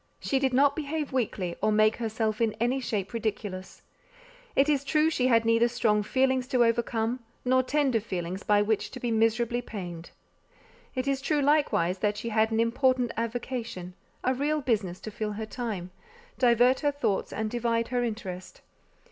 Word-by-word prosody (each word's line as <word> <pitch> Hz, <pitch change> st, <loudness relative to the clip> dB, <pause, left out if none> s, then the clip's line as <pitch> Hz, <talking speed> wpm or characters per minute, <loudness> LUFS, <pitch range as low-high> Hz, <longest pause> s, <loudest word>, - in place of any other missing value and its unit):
She 270 Hz, -, 0 dB
did 265 Hz, -1 st, +1 dB
not 280 Hz, +2 st, +4 dB
behave 300 Hz, -1 st, -3 dB
weakly, 195 Hz, -8 st, -1 dB
or 215 Hz, +1 st, +2 dB
make 215 Hz, +1 st, +3 dB
herself 220 Hz, -1 st, -2 dB
in 225 Hz, -2 st, +2 dB
any 245 Hz, +4 st, +1 dB
shape 210 Hz, -5 st, -3 dB
ridiculous. 205 Hz, -4 st, -4 dB, 0.7 s
It 275 Hz, -, +4 dB
is 285 Hz, -2 st, +2 dB
true 305 Hz, +2 st, +2 dB
she 255 Hz, -4 st, +1 dB
had 230 Hz, -2 st, +4 dB
neither 230 Hz, +1 st, +4 dB
strong 220 Hz, -3 st, +1 dB
feelings 260 Hz, +3 st, +1 dB
to 250 Hz, -3 st, +3 dB
overcome, 230 Hz, +1 st, 0 dB, 0.3 s
nor 255 Hz, +1 st, +4 dB
tender 265 Hz, -2 st, +1 dB
feelings 185 Hz, -3 st, -4 dB
by 205 Hz, 0 st, +3 dB
which 215 Hz, 0 st, 0 dB
to 255 Hz, -, -8 dB
be 240 Hz, -1 st, -2 dB
miserably 230 Hz, +2 st, +1 dB
pained. 175 Hz, -7 st, -7 dB, 0.9 s
It 255 Hz, +1 st, -2 dB
is 275 Hz, -1 st, 0 dB
true 290 Hz, +1 st, +1 dB
likewise 270 Hz, -, +2 dB
that 205 Hz, 0 st, 0 dB
she 235 Hz, -, -4 dB
had 220 Hz, 0 st, +2 dB
an 225 Hz, 0 st, 0 dB
important 250 Hz, +1 st, +2 dB
avocation, 230 Hz, -5 st, -4 dB, 0.3 s
a 255 Hz, -, +2 dB
real 295 Hz, +4 st, 0 dB
business 205 Hz, -8 st, -1 dB
to 215 Hz, -, -7 dB
fill 210 Hz, 0 st, -3 dB
her 220 Hz, +1 st, -4 dB
time, 215 Hz, -6 st, -5 dB, 0.5 s
divert 245 Hz, +1 st, +4 dB
her 290 Hz, -1 st, +1 dB
thoughts, 280 Hz, -9 st, -1 dB
and 220 Hz, 0 st, -2 dB
divide 230 Hz, -1 st, 0 dB
her 245 Hz, -1 st, 0 dB
interest. 190 Hz, -6 st, -6 dB
230 Hz, 175 wpm, -28 LUFS, 215-260 Hz, 0.9 s, not